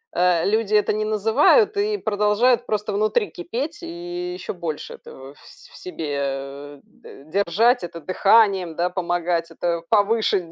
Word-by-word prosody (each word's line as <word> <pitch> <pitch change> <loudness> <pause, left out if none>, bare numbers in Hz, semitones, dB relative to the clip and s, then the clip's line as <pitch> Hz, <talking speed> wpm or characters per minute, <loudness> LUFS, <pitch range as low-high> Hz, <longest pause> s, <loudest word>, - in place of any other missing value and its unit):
э, 180 -2 +2
люди 215 0 +1
это 210 - +2
не 215 0 -1
называют 225 - +3
и 415 +1 0
продолжают 215 - +1
просто 210 -1 -2
внутри 215 +2 0
кипеть. 270 - -5
И 350 +1 -6
ещё 365 - -6
больше 170 -5 -6
этого 135 +1 -12
ф 145 - -21
в - - -17
себе, 155 -5 -5
э, 140 +1 -5
д 135 - -16
держать, 200 - +2
это 170 -1 -7
дыханием, 190 0 +2
да, 175 +2 -1
помогать, 175 -2 -1
это 170 0 -2
повыше, 205 -5 +1
200 Hz, 150 wpm, -22 LUFS, 170-230 Hz, -, называют